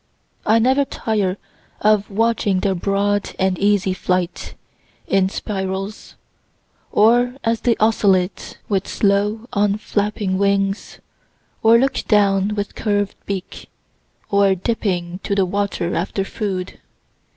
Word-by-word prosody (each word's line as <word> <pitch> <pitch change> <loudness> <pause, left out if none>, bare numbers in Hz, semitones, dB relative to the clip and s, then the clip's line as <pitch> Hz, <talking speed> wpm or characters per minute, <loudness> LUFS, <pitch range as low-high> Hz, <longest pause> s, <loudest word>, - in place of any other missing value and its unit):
I 220 - +5
never 260 +5 +3
tire 205 -7 -1 0.4
of 210 -1 +2
watching 210 -3 +1
their 195 - +1
broad 200 +2 -1
and 190 -1 +1
easy 200 -2 +2
flight, 180 -1 -2 0.5
in 190 -1 +2
spirals, 195 +1 -5 0.8
or 240 +4 +4
as 230 -1 0
they 235 -2 +2
oscillate 200 -4 +1
with 195 -2 -1
slow 210 +3 0
unflapping 205 -1 0
wings, 200 0 0 0.6
or 225 +1 +6
look 270 +2 +1
down 200 -1 +3
with 205 0 -3
curved 205 -2 -1
beak, 195 -2 -6 0.6
or 200 -1 +4
dipping 180 -3 -2
to 200 - -2
the 195 -1 +3
water 195 -2 -2
after 190 +3 -1
food. 190 -3 -4
200 Hz, 115 wpm, -20 LUFS, 190-215 Hz, 0.8 s, or